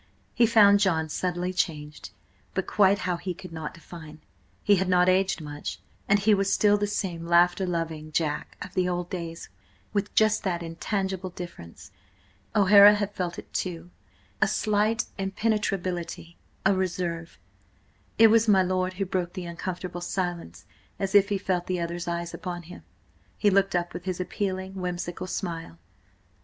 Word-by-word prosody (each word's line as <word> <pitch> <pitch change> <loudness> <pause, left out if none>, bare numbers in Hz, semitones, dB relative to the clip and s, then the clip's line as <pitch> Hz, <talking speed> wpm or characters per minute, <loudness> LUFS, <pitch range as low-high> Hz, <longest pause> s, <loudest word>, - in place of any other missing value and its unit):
He 235 - +4
found 205 -3 +6
John 165 -6 +1
subtly 180 +2 -2
changed, 150 - -3 0.5
but 190 - 0
quite 200 -1 +4
how 180 -1 0
he 180 0 -5
could 185 -1 -11
not 160 -2 -6
define. 160 -2 -11 0.4
He 205 -1 +5
had 185 0 0
not 180 0 +4
aged 185 -1 +2
much, 145 -1 -6 0.3
and 200 - +6
he 205 +2 +3
was 195 -1 +1
still 205 -1 +4
the 205 0 0
same 175 -5 -3
laughter 175 +2 +4
loving 160 -3 -3
Jack 155 -1 -2
of 185 - -10
the 180 -1 +1
old 175 0 -3
days, 170 -2 -6 0.4
with 205 -1 -1
just 215 -1 +4
that 175 -3 -1
intangible 190 +2 -3
difference. 170 - -10 0.6
O'Hara 205 0 +8
had 205 0 -2
felt 175 -3 -3
it, - - -11
too: 175 -1 -4 0.5
a - - +5
slight 215 +1 +1
impenetrability, 195 -5 -2 0.3
a 195 - +5
reserve. 175 -3 -3 0.8
It 225 0 +8
was 225 0 +4
my 195 -3 +5
lord 185 0 0
who 195 +1 -2
broke 180 -2 -2
the 185 -2 -6
uncomfortable 175 +1 -5
silence 175 - -4 0.3
As 195 0 -3
if 200 0 +6
he 200 - +1
felt 185 -2 -2
the 185 -1 -1
other's 170 +1 -4
eyes 170 0 -3
upon 175 -3 -5
him, 180 +2 -11 0.6
he 205 - +3
looked 195 -1 +2
up 175 0 -1
with 175 - -7
his 185 -1 -3
appealing, 190 0 -3
whimsical 180 -1 -4
smile. 165 - -5
185 Hz, 160 wpm, -26 LUFS, 170-195 Hz, 0.8 s, O'Hara